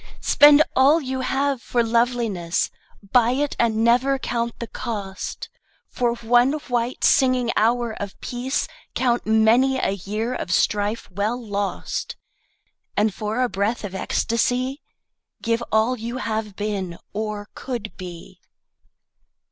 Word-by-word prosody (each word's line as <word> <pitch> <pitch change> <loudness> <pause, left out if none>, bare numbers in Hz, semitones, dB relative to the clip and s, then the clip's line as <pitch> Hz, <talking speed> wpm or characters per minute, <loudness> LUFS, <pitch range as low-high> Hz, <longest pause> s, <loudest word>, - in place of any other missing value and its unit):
Spend 295 +1 +7
all 280 +5 +5
you 265 -3 -3
have 270 0 0
for 240 0 0
loveliness, 230 -7 0 0.4
Buy 245 -1 +4
it 285 +2 -1
and 225 -1 +2
never 250 +4 +3
count 235 -2 -2
the 235 - -5
cost; 200 -4 -5 0.4
For 240 -1 0
one 240 +3 +3
white 245 -5 -2
singing 255 -3 +4
hour 235 +1 +2
of 200 -1 -6
peace 250 +2 -2 0.3
Count 240 -3 +1
many 225 +5 +4
a 260 - 0
year 210 +5 -3
of 185 - -4
strife 205 +3 +1
well 210 +6 -1
lost, 205 -4 -3 0.8
And 210 -1 +2
for 215 +5 -2
a - - +2
breath 215 +2 -1
of 200 -2 -5
ecstacy 250 +7 0 0.6
Give 230 +1 0
all 220 +4 +3
you 235 +1 -5
have 220 -4 -3
been, 195 -5 -3 0.2
or 210 0 -4
could 235 -5 -5
be. 175 -3 -10
235 Hz, 130 wpm, -23 LUFS, 210-250 Hz, 0.8 s, Spend